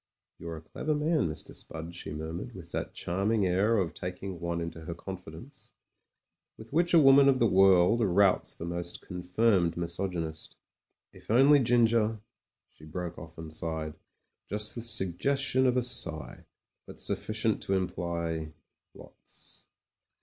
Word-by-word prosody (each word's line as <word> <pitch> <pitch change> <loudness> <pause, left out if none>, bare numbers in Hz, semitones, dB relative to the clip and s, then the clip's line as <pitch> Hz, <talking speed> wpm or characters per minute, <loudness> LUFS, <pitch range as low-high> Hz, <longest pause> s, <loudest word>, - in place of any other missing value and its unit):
You're 85 -1 -6
a - - -10
clever 155 - -3
man, 150 - +1
Mr. 75 - -7
Spud," 80 +1 -7
she 85 - -7
murmured, 80 +2 -6
with - - -11
that - - -4
charming 100 +4 0
air 100 +5 +2
of 85 -5 0
taking 90 +1 -6
one 85 0 -2
into 85 -1 -5
her 85 - -5
con 95 - -6
fidence, 95 - -13 0.8
with 110 +4 -12
which 170 +2 +3
a - - +8
woman 140 -1 +7
of 135 - +3
the 120 - +3
world 95 +1 +5
routs 100 -1 +3
the 85 - -7
most 85 0 -4
confirmed 90 0 +1
misogjmist 85 -2 -4 0.6
"If - - -17
only 135 +6 +6
Ginger 115 -3 +3 0.3
" - - -61
She - - -19
broke 85 +2 -6
off 80 +1 -12
and 80 -1 -5
sighed: 80 -1 -3 0.6
just 105 +2 0
the 120 - -5
suggestion 125 +6 +1
of 125 0 +2
a 125 - +2
sigh; 115 -11 -1 0.4
but - - -10
sufficient 110 0 0
to 95 - +1
imply 85 -3 -3 0.2
— - - -24
^lots. - - -14
95 Hz, 155 wpm, -29 LUFS, 85-115 Hz, 0.8 s, a